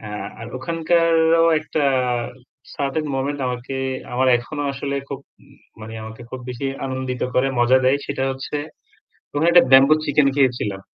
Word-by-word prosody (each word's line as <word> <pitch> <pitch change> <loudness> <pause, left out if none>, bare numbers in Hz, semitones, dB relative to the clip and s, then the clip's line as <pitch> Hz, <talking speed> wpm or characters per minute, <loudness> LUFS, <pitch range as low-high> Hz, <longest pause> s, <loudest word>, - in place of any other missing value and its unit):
এ্যা 105 -1 -8 0.3
আর 115 - -7
ওখানকারও 165 +2 +2 0.2
একটা 155 -1 -3 0.9
certain 140 +2 -2
moment 140 +2 -2
আমাকে 125 +1 -4 0.4
আমার 130 +2 +1
এখনো 145 +5 -6
আসলে 140 0 -4
খুব, 140 -1 -6 0.6
মানে 110 +1 -8
আমাকে 110 +2 -10
খুব 130 - -6
বেশি 125 +2 -6 0.2
আনন্দিত 130 -1 -4
করে, 130 +2 +2
মজা 120 +2 +5
দেয়। 130 +2 +4
সেটা 140 -2 -3
হচ্ছে 135 +2 -5 0.8
কোন 145 +2 -1
একটা 175 0 +7
ব্যাম্বো 135 +3 +7
চিকেন 145 -1 +2
খেয়েছিলাম। 120 -8 0
135 Hz, 145 wpm, -21 LUFS, 125-150 Hz, 0.9 s, একটা